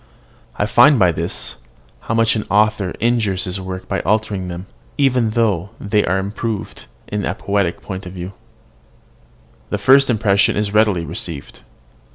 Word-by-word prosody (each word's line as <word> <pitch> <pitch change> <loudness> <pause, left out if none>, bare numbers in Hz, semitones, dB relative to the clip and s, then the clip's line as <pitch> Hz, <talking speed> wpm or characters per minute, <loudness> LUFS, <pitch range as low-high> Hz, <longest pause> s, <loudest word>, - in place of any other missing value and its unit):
I 105 - 0
find 140 +6 +6
by 90 -5 +4
this, 80 - -4 0.4
how 115 - -3
much 115 0 +3
an 110 - -3
author 105 -2 +2
injures 110 -5 +1
his 95 +1 -3
works 95 0 -6
by - - -2
altering 105 -3 -1
them, 90 +1 -6 0.3
even 125 -5 +2
though 100 -5 +1
they 105 +1 +1
be - - -3
improved 100 +3 -3 0.2
in 105 -1 -3
a 90 - -2
poetical 100 -4 -1
point 95 -1 -6
of 90 - -8
view. 90 +1 -7 1.4
The 105 - -1
first 135 +6 +5
impression 105 -4 +3
is 105 -1 -1
readily 105 -6 +3
received. 80 -2 -6
100 Hz, 155 wpm, -19 LUFS, 95-110 Hz, 1.4 s, find